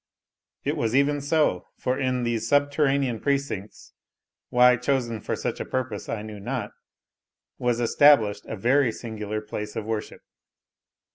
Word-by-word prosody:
It - - -1
was 115 +1 0
even 145 +1 +3
so; 145 - +1
for 125 - -1
in 130 -2 0
these 120 -2 -1
subterranean 140 -4 +2
precincts, 140 -8 -3 0.6
why 125 0 +6
chosen 125 -3 -1
for - - -2
such - - -3
a - - -2
purpose 130 -5 -3
I 105 -2 -3
knew 110 -1 -8
not, 100 - -4 0.9
was 120 -1 0
established 115 -4 +4
a - - -4
very 125 +4 +3
singular 110 -2 -5
place 105 0 -6
of 110 -2 -3
worship. 110 -1 -4
120 Hz, 140 wpm, -25 LUFS, 110-140 Hz, 0.9 s, why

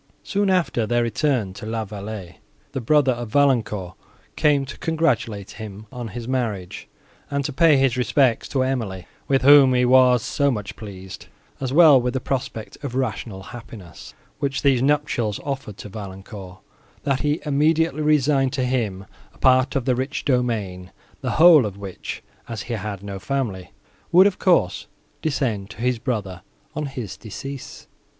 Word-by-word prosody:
Soon 205 -1 0
after 170 - +1
their 120 +1 +2
return 120 -5 0
to 100 - -11
La 110 0 -2
Vallée, 100 -3 -7 0.3
the 135 - -4
brother 140 +2 +3
of 120 -2 -4
Valancourt 110 -9 +1 0.4
came 145 -3 +3
to 140 - -8
congratulate 125 - -1
him 105 0 -8
on 125 -3 -6
his 115 +2 -7
marriage, 110 -8 -3 0.4
and 140 -1 -1
to 145 - -3
pay 160 0 +5
his 135 -2 +2
respects 125 -1 +2
to 130 -2 +1
Emily, 110 -9 -3 0.2
with 135 -1 +2
whom 140 -2 +7
he 125 0 +3
was 125 -2 +5
so 140 0 +1
much 105 -6 -4
pleased, 95 -3 -9 0.3
as 130 -2 -3
well 155 -2 +7
as - - +2
with 125 0 -1
the - - +1
prospect 130 -3 -5
of 130 -3 -4
rational 110 -6 -3
happiness, 110 -8 -11 0.2
which 140 -1 -2
these 135 -4 +4
nuptials 135 -7 0
offered 135 -8 -5
to - - -8
Valancourt, 95 -1 -9 0.5
that 135 -2 0
he 150 +2 0
immediately 155 +1 +2
resigned 145 -3 +2
to 130 -3 0
him 110 -7 -2 0.3
a - - -20
part 130 +1 +3
of 135 -3 0
the 130 - +3
rich 130 +4 -3
domain, 110 -9 -1 0.3
the - - -2
whole 160 -3 +8
of 100 -3 -4
which, 100 -2 -7 0.3
as 115 -3 -4
he 120 - -5
had 105 -2 -5
no 100 -1 -6
family, 105 -9 -3 0.4
would 185 +3 +7
of 200 -2 +1
course 140 - +2 0.3
descend 120 -10 -1
to 110 - -11
his 125 +1 0
brother, 105 -7 -3 0.3
on 150 -1 -2
his 125 -7 -6
decease. 135 +4 -8
125 Hz, 165 wpm, -22 LUFS, 105-140 Hz, 0.5 s, whole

